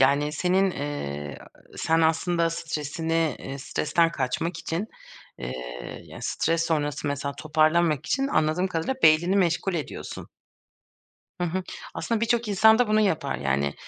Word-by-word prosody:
Yani, 140 +3 +3
senin, 185 +4 +2
ııı, 75 - -4 0.4
sen 165 0 +2
aslında 165 +1 +2
stresini, 165 -1 -1
ııı, 135 - -5
stresten 165 +4 +1
kaçmak 155 +6 -2
için, 175 +7 -3 0.5
ııı, 65 0 -4 0.5
yani, - - -11
stres 165 0 0
sonrası 150 -2 -1
mesela 140 0 -2
toparlanmak 155 0 +2
için 270 +9 +1
anladığım 155 - +2
kadarıyla, 180 +7 -1
beynini 170 +5 +5
meşgul 180 0 +1
ediyorsun. 155 - -5 1.1
Hı 175 - 0
hı. 185 +2 -1 0.3
Aslında 230 -2 -1
birçok 230 0 +1
insan 220 +3 +6
da 245 -3 +3
bunu 215 0 +4
yapar. 160 - 0
Yani, 70 +1 0
165 Hz, 135 wpm, -26 LUFS, 145-180 Hz, 1.1 s, insan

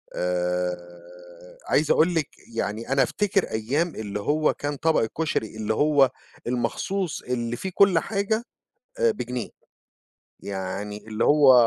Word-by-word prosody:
آآ، 90 0 -4
عايز 150 0 +3
أقول 170 +2 +4
لِك 160 -3 +1 0.3
يعني 110 0 -3
أنا 135 0 +4
أفتكر 200 -2 +1
أيام 140 +10 0
اللي 105 -1 -4
هو 150 +8 +2
كان 145 0 -3
طبق 160 +3 +2
الكشري، 110 -3 -2
اللي 110 0 -1
هو 145 +1 +4 0.4
المخصوص 170 +9 -1
اللي 120 -1 -2
فيه 190 +9 -5
كل 195 -4 +6
حاجة، 220 +4 -1 0.6
آآ، 470 -1 +4
بجنيه، 125 - -4 0.9
يعني 100 +2 -5
اللي 110 0 -1
هو 145 -3 +7
125 Hz, 130 wpm, -25 LUFS, 100-160 Hz, 0.9 s, هو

